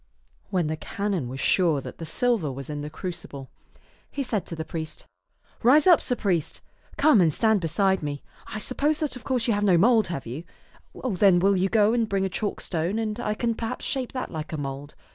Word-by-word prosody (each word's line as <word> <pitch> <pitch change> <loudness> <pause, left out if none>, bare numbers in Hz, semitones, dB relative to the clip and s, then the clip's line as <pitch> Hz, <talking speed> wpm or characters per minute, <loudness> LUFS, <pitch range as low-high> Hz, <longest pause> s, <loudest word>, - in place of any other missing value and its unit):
When 185 -4 +1
the 155 +1 -2
canon 190 -6 -3
was 130 +1 -6
sure 165 -4 +3
that - - -9
the 165 - -6
silver 220 - 0
was 135 +2 -7
in 145 -1 -4
the 150 - -5
crucible, 150 -5 -7 0.6
he 280 - -3
said 215 -8 -1
to 165 - -6
the 160 -1 -5
priest, 160 -2 -6 0.3
" - - -35
Rise 270 +6 +6
up, 355 -3 +7
sir 250 - 0
priest. 180 -9 -1 0.4
Come 285 -9 +5
and 165 -3 +4
stand 220 +4 +2
beside 190 +4 +1
me. 145 -1 -4 0.2
I 215 - -5
suppose 285 +7 0
that 305 -4 -1
of 250 - -10
course 250 -3 0
you 230 - +2
have 205 0 0
no 185 -4 +5
mould, 220 +3 +4
have 165 -6 -5
you? 130 +8 -6 0.6
Then 195 -5 +4
will 195 +3 +3
you 190 +1 +1
go 215 0 +4
and 230 -2 +1
bring 195 -1 +1
a - - -1
chalk 205 +2 -3
stone, 170 +4 -1
and 220 0 -2
I 215 -3 -1
can 230 +1 0
perhaps 225 0 -5
shape 260 -3 -2
that 255 - -4
like 155 -2 -5
a 160 - -3
mould. 140 0 -6
195 Hz, 220 wpm, -25 LUFS, 160-225 Hz, 0.6 s, up